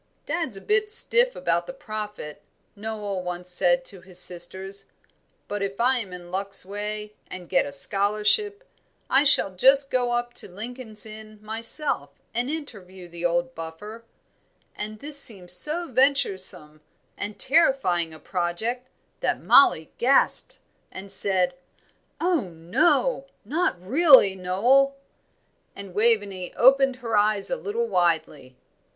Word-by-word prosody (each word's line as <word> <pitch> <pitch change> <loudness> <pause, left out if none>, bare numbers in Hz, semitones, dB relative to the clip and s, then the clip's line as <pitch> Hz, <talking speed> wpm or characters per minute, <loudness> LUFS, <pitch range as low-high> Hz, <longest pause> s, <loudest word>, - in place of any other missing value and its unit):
"Dad's 325 - -3
a - - -10
bit 425 0 +1
stiff 485 +2 +3
about - - -1
the - - -7
Prophet," 210 - -7 0.3
Noel 205 -2 -5
once 180 0 -6
said 260 +8 +2
to 195 -7 -10
his 185 -1 -13
sisters, 190 +2 -1 0.6
"but 205 0 -5
if 195 0 -4
I 250 +2 +3
am 205 -5 -7
in 175 -1 -10
luck's 195 0 +2
way 210 +1 -6
and 180 -2 -9
get - - +1
a - - -7
scholarship, 210 - 0 0.4
I 270 +2 +5
shall 275 -9 +3
just 270 +8 +3
go 245 -1 0
up 240 0 -2
to - - -9
Lincoln's 220 +3 -7
Inn 215 0 -12
myself 225 - +1 0.2
and 240 +3 -1
interview 195 - -7
the 170 0 -7
old 175 0 -1
buffer;" 175 +8 -9 0.7
and 215 +1 -6
this 290 +4 +3
seemed 185 -8 +2
so 305 - 0
venturesome 190 - -1 0.3
and 205 +1 -6
terrifying 260 - +1
a 160 - -12
project 195 +10 -4 0.3
that - - -1
Mollie 160 - +4
gasped, 265 +3 +3 0.3
and 195 +1 -5
said, 185 -3 +4 0.7
"Oh, 350 -1 +1
no, 190 - 0 0.2
not 320 - -1
really, 260 - +5
Noel!" 235 +10 +1 0.8
and 200 -2 -10
Waveney 205 -4 -1
opened 270 +1 +4
her 235 -3 -4
eyes 210 -1 +2
a - - +1
little 470 0 -3
widely. 160 - -1
210 Hz, 135 wpm, -24 LUFS, 180-265 Hz, 0.8 s, I